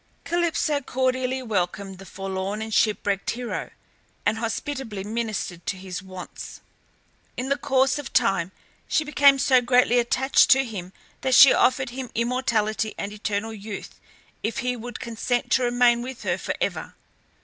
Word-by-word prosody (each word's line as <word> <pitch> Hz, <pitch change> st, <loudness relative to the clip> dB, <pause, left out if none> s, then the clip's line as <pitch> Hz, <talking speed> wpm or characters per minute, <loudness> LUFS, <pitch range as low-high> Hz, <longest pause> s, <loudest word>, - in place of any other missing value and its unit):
Calypso 340 Hz, -3 st, 0 dB
cordially 255 Hz, 0 st, -1 dB
welcomed 195 Hz, -3 st, -2 dB
the 195 Hz, -, -11 dB
forlorn 195 Hz, +1 st, -4 dB
and 220 Hz, 0 st, -5 dB
shipwrecked 205 Hz, -2 st, +1 dB
hero, 245 Hz, 0 st, -4 dB, 0.6 s
and 220 Hz, -, +1 dB
hospitably 230 Hz, -2 st, -4 dB
ministered 215 Hz, -5 st, -3 dB
to 195 Hz, -, -1 dB
his 185 Hz, -1 st, -6 dB
wants. 185 Hz, -1 st, -9 dB, 0.8 s
In 255 Hz, +2 st, -3 dB
the 280 Hz, -, +3 dB
course 270 Hz, -1 st, +1 dB
of 290 Hz, -, -7 dB
time 195 Hz, -7 st, +2 dB, 0.4 s
she 315 Hz, -, +1 dB
became 285 Hz, -2 st, +5 dB
so 265 Hz, -2 st, +4 dB
greatly 245 Hz, 0 st, +4 dB
attached 260 Hz, +3 st, +3 dB
to 270 Hz, 0 st, +5 dB
him 190 Hz, -6 st, -7 dB, 0.3 s
that 260 Hz, -1 st, +2 dB
she 275 Hz, -, +10 dB
offered 260 Hz, 0 st, +2 dB
him 255 Hz, 0 st, -6 dB
immortality 230 Hz, -3 st, 0 dB
and 200 Hz, +1 st, -4 dB
eternal 210 Hz, +1 st, -3 dB
youth 210 Hz, -1 st, -8 dB, 0.4 s
if 220 Hz, -, -2 dB
he 250 Hz, 0 st, 0 dB
would 240 Hz, 0 st, -7 dB
consent 235 Hz, +1 st, -2 dB
to 260 Hz, -, +4 dB
remain 240 Hz, -1 st, +3 dB
with 260 Hz, +1 st, -7 dB
her -, -, -1 dB
for -, -, -3 dB
ever. -, -, -3 dB
240 Hz, 150 wpm, -24 LUFS, 205-260 Hz, 0.8 s, she